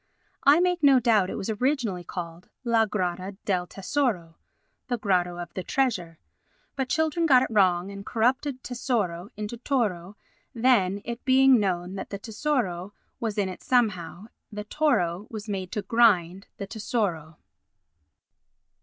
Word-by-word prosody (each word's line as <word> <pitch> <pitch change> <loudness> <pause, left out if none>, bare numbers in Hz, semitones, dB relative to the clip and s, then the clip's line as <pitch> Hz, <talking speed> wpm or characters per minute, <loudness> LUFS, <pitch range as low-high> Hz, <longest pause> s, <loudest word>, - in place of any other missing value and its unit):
I 285 +4 +7
make 360 0 +1
no 275 -3 +6
doubt 220 -6 +3
it - - -4
was 210 - -3
originally 225 -5 -1
called 170 -1 -7
"La 230 -2 +3
grotta 185 -1 -3
del 180 -3 0
tesoro" 195 - -2 0.5
[The 245 - -1
grotto 180 -5 0
of 175 -1 -7
the 185 - -3
treasure], 180 -9 -1 0.6
but 265 -2 -2
children 320 +2 +1
got 255 -4 +6
it - - -3
wrong, 185 -3 +2
and 200 0 -8
corrupted 255 +5 0
"tesoro" 210 -8 -2
into 210 +2 -5
"toro"; 210 -8 -2 0.4
then, 205 -5 +2
it 235 +1 -5
being 265 -1 +5
known 180 -2 -1
that - - -6
the 200 - -4
"tesoro" 210 -5 -2 0.3
was 220 -3 -3
in 200 -2 +1
it 185 - -7
somehow, 210 -7 0 0.3
the 210 0 -5
"toro" 210 - 0
was 215 -1 -7
made 190 -3 -4
to 210 - -2
grind 195 -4 +3
the 200 - -5
"tesoro." 195 -7 -3
210 Hz, 145 wpm, -26 LUFS, 185-250 Hz, 0.6 s, I